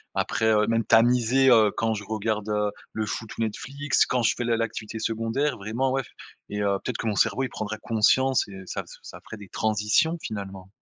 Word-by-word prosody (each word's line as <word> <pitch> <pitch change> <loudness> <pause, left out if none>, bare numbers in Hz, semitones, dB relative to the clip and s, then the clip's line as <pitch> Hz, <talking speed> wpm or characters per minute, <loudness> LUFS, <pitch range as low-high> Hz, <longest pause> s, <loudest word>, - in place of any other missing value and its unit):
après 110 - 0
heu 105 -1 +3
même 115 0 +1
tamiser, 125 +3 +4
heu, 110 -4 +6
quand 115 -1 +1
je 105 -1 -5
regarde, 110 0 -2
heu, 105 -1 0 0.2
le 110 - -2
foot, 110 +1 -5
ou - - -3
Netflix, 135 +6 0
quand 125 - 0
je - - +3
fais - - -2
l'a 115 -1 +2
l'activité 110 -1 -4
secondaire 115 +6 -1
vraiment, 115 +6 -1
ouais. 135 0 0 0.5
Et 105 0 -3
heu, 100 -1 +1
peut-être 125 - -3
que - - -3
mon 105 - 0
cerveau, 130 - +2
il 130 - -2
prendrait 110 0 -5
conscience 130 +4 +2
et 95 -1 -9
ça - - -4
f - - -25
ça - - -11
ferait 110 - -10
des 100 - -11
transitions 110 - +1
finalement. 95 -3 -7
110 Hz, 210 wpm, -25 LUFS, 105-120 Hz, 0.5 s, heu